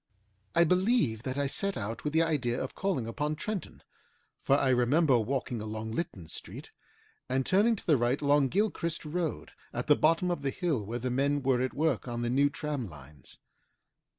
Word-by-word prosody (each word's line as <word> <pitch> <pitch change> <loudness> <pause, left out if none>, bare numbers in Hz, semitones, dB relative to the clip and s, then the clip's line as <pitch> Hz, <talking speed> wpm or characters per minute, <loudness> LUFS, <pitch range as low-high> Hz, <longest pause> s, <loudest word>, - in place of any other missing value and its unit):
I 170 - +6
believe 180 - +2
that 130 +2 -4
I 145 - +1
set 195 +8 -2
out 110 +2 -5
with 150 - -1
the 160 +2 +3
idea 135 -7 0
of - - -4
calling 185 - -1
upon 150 +7 -2
Trenton, 210 +4 -5 0.6
for 135 - +3
I 135 - +1
remember 130 +2 +4
walking 125 0 -2
along 110 +1 -5
Lytton 105 - -4
Street - - -8 0.6
and 130 0 0
turning 210 +5 +4
to - - -10
the 155 -5 +4
right 120 +3 +1
along 145 -1 +3
Gilchrist 170 -2 -1
Road 160 0 -3 0.2
at 125 - -3
the 150 - +5
bottom 165 +4 +2
of 175 - -2
the 140 - 0
hill 150 - -1
where 115 +4 -4
the 125 +1 -3
men 140 +2 +1
were 130 -2 +2
at 130 - -2
work 145 -9 0
on 120 0 -3
the 120 - 0
new 140 +3 +4
tram 140 -5 -4
lines. 75 -3 -12
140 Hz, 190 wpm, -30 LUFS, 120-160 Hz, 0.6 s, I